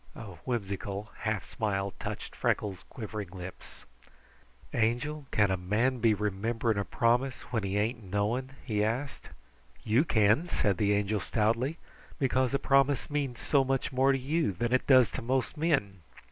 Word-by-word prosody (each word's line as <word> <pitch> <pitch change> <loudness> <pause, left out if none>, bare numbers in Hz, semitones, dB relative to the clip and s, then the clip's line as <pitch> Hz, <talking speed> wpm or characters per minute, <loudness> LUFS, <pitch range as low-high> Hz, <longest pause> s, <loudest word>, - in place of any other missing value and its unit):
A - - -8 0.2
whimsical 100 -3 -3
half 110 -3 -2
smile 100 -3 -2
touched - - -6
Freckles' 95 -3 -1
quivering 105 -5 -6
lips. 95 0 -10 0.9
"Angel, 125 +6 0
can 105 -2 +2
a 95 - +1
man 110 +8 0
be 110 -2 +4
remembering 105 +2 -1
a - - 0
promise 120 +5 +1
when 110 - +1
he 100 0 -1
ain't 115 +3 0
knowing?" 105 +7 -1 0.2
he 105 -4 0
asked. 125 +6 -3 0.5
"You 115 +6 +3
can," 110 +3 +3
said 100 - +1
the 105 +1 +2
Angel 105 +1 +1
stoutly, 115 - 0 0.4
"because 130 -3 +1
a - - +4
promise 140 +1 +2
means 140 -4 -2
so 140 -2 +3
much 135 +1 -1
more 135 +1 +3
to 135 - +2
you 145 - 0
than 120 +7 -1
it 130 - +2
does 130 -4 +6
to - - -4
most 130 +3 -1
men." 145 - 0
115 Hz, 160 wpm, -30 LUFS, 105-130 Hz, 0.9 s, does